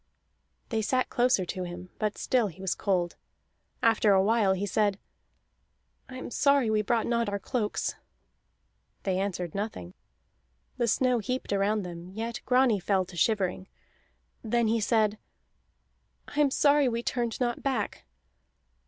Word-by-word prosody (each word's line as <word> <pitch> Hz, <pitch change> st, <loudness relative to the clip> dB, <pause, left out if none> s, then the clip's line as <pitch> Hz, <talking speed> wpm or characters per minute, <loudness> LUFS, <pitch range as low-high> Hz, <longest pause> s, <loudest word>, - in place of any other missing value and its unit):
They 225 Hz, -2 st, 0 dB
sat 255 Hz, +4 st, 0 dB
closer 245 Hz, -6 st, +2 dB
to 185 Hz, +1 st, -4 dB
him, 180 Hz, +1 st, -8 dB
but 210 Hz, -1 st, -1 dB
still 245 Hz, -4 st, +1 dB
he 185 Hz, -1 st, -11 dB
was 190 Hz, -1 st, -1 dB
cold. 180 Hz, -4 st, -1 dB, 0.7 s
After 220 Hz, -2 st, +4 dB
a 190 Hz, 0 st, +4 dB
while 210 Hz, -2 st, +3 dB
he 190 Hz, +2 st, -2 dB
said: 205 Hz, 0 st, +1 dB, 1.1 s
"I 255 Hz, -, -8 dB
am 255 Hz, -, -7 dB
sorry 280 Hz, -3 st, +3 dB
we 215 Hz, -1 st, +2 dB
brought 225 Hz, +2 st, +1 dB
not 235 Hz, -2 st, 0 dB
our 200 Hz, -, -1 dB
cloaks." 210 Hz, +1 st, -2 dB, 1.1 s
They 190 Hz, -1 st, 0 dB
answered 180 Hz, -4 st, -3 dB
nothing. 195 Hz, -, -5 dB, 0.8 s
The 240 Hz, -2 st, +1 dB
snow 250 Hz, +1 st, +2 dB
heaped 250 Hz, -1 st, -3 dB
around 200 Hz, +1 st, +1 dB
them, 175 Hz, 0 st, -8 dB
yet 225 Hz, +4 st, -5 dB
Grani 250 Hz, -4 st, +4 dB
fell 190 Hz, 0 st, +1 dB
to 175 Hz, -, -12 dB
shivering. 190 Hz, 0 st, 0 dB, 0.8 s
Then 235 Hz, 0 st, +1 dB
he 230 Hz, +1 st, +2 dB
said: 215 Hz, -1 st, +2 dB, 1.1 s
"I 290 Hz, -, -5 dB
am 290 Hz, -2 st, +5 dB
sorry 285 Hz, 0 st, +4 dB
we 235 Hz, 0 st, -2 dB
turned 235 Hz, -3 st, -2 dB
not 240 Hz, -2 st, -1 dB
back." 270 Hz, -2 st, -2 dB
215 Hz, 145 wpm, -28 LUFS, 190-240 Hz, 1.1 s, am